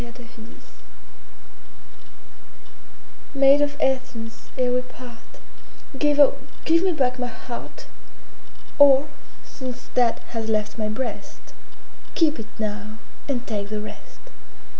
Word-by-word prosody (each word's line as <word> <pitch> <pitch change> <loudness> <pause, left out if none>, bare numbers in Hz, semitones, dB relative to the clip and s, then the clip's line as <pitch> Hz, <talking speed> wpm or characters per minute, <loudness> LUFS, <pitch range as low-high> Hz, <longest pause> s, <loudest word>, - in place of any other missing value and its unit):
Maid - - -9
of 235 +1 -14
Athens 230 -1 -14 2.7
MAID 275 +1 +6
of 290 0 +1
Athens, 235 -4 -2
ere 250 -1 +2
we 250 - +2
part, 250 -2 -14 0.6
Give, 295 +1 +2
oh, 285 - +6 0.3
give 330 +1 +4
me 380 - +3
back 255 -5 0
my 250 - -1
heart! 240 0 -8 0.9
Or, 280 0 +7 0.4
since 255 -2 -8
that 245 -2 +3
has 225 -1 -4
left 215 +1 -1
my 215 -1 -1
breast, 235 +3 -6 0.6
Keep 315 -2 +3
it 220 - -6
now, 215 0 -4 0.3
and 255 -2 -1
take 205 -3 -3
the 215 0 -2
rest! 215 - -10
250 Hz, 120 wpm, -24 LUFS, 225-275 Hz, 2.7 s, Or